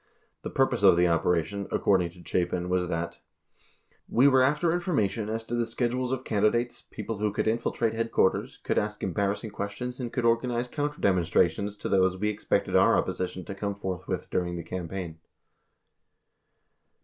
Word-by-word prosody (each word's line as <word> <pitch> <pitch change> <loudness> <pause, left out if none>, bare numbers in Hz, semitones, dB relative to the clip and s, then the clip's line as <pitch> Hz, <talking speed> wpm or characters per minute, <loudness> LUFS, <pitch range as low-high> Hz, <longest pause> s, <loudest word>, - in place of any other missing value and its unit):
The - - -5
pur - - +3
pose - - -3
of - - +7
the 90 0 +4
operation, 85 +3 0
according 90 -3 +2
to 90 -1 -15
Chapin 90 0 -1
was 90 -1 +1
that: 85 -1 -3 0.9
we 125 +4 +5
were 130 -2 +5
after 150 +6 +3
information 115 - 0
as 110 +1 -2
to 115 - -7
the 120 0 +1
schedules 120 +2 -1
of 130 -1 -2
candidates, 115 +3 +1
people 110 -2 -5
who 105 0 +1
could 105 - -1
infiltrate 115 0 0
headquarters, 115 -4 +1
could - - 0
ask 105 0 -4
embarrassing 100 +3 -1
questions 110 +6 -5
and 120 -2 -4
could 125 -3 -1
organize 120 +1 +1
counter 145 +2 -3
dem 95 -2 +3
onstrations 90 +4 +1
to - - -2
those 95 -1 +2
we 105 +2 0
expected 105 0 -1
our - - +5
opposition 90 -1 -2
to - - -5
come 100 0 -3
forth 95 -3 -5
with - - -3
during 90 -1 -1
the 85 - -5
campaign. 90 -2 -5
105 Hz, 175 wpm, -27 LUFS, 90-120 Hz, 0.9 s, of